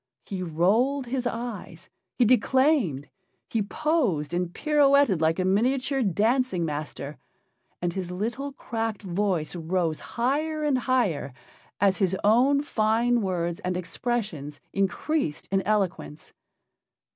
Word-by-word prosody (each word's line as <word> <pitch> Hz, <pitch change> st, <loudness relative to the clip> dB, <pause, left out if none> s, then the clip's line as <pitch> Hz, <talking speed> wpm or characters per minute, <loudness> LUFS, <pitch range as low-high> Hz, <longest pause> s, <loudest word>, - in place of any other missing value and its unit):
He 190 Hz, -2 st, -5 dB
rolled 210 Hz, -, +1 dB
his 250 Hz, 0 st, -2 dB
eyes, 235 Hz, -2 st, -6 dB, 0.3 s
he 245 Hz, -, +4 dB
declaimed, 250 Hz, -, +2 dB, 0.4 s
he 225 Hz, -, +1 dB
posed 205 Hz, -, 0 dB
and 175 Hz, 0 st, -1 dB
pirouetted 280 Hz, -, +3 dB
like 160 Hz, +1 st, +2 dB
a 185 Hz, -, 0 dB
miniature 255 Hz, +7 st, +1 dB
dancing 220 Hz, -1 st, +1 dB
master, 150 Hz, -1 st, -5 dB, 0.6 s
and 175 Hz, -1 st, 0 dB
his 185 Hz, -2 st, -4 dB
little 235 Hz, +10 st, -3 dB
cracked 225 Hz, -5 st, -4 dB
voice 180 Hz, -3 st, -1 dB
rose 165 Hz, -1 st, -1 dB, 0.2 s
higher 305 Hz, +6 st, 0 dB
and 285 Hz, -4 st, +2 dB
higher 195 Hz, -, 0 dB, 0.4 s
as 195 Hz, -2 st, +3 dB
his 190 Hz, -2 st, +1 dB
own 260 Hz, +7 st, +4 dB
fine 235 Hz, -1 st, +2 dB
words 175 Hz, -3 st, -2 dB
and 180 Hz, 0 st, -2 dB
expressions 180 Hz, -, -3 dB
increased 195 Hz, -, -1 dB
in 195 Hz, 0 st, +2 dB
eloquence. 190 Hz, -, -2 dB
210 Hz, 120 wpm, -26 LUFS, 175-255 Hz, 0.6 s, he